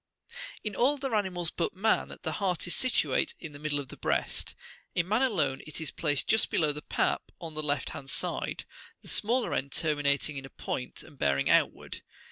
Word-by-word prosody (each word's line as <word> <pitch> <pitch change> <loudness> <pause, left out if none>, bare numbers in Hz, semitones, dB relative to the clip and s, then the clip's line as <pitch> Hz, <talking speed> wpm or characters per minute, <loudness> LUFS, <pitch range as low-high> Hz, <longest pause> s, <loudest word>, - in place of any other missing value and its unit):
In 210 -2 -2
all 270 +4 +4
other 270 -3 -3
animals 180 -5 0
but 170 - -2
man 215 +4 +1
the - - -1
heart 185 -4 0
is 175 - +1
situate 255 -1 +2
in 160 - -7
the 145 - -9
middle 150 -1 0
of 135 -3 -7
the - - -10
breast; - - -1 0.4
in 170 0 +1
man 215 +5 +2
alone 165 - +1
it 155 - -6
is 160 - -3
placed 145 -3 0
just 220 +1 +4
below 155 -2 +2
the 150 +1 -4
pap - - 0
on 165 -2 -6
the 155 - -2
left 145 -1 0
hand 135 - -7
side, - - -2 0.4
the - - -9
smaller 240 +3 +3
end 140 +1 -1
terminating 145 -2 +1
in 135 - -4
a - - -17
point, 125 - -5
and 140 - -16
bearing 70 -1 +2
outward. - - +1
160 Hz, 200 wpm, -30 LUFS, 145-205 Hz, 0.4 s, all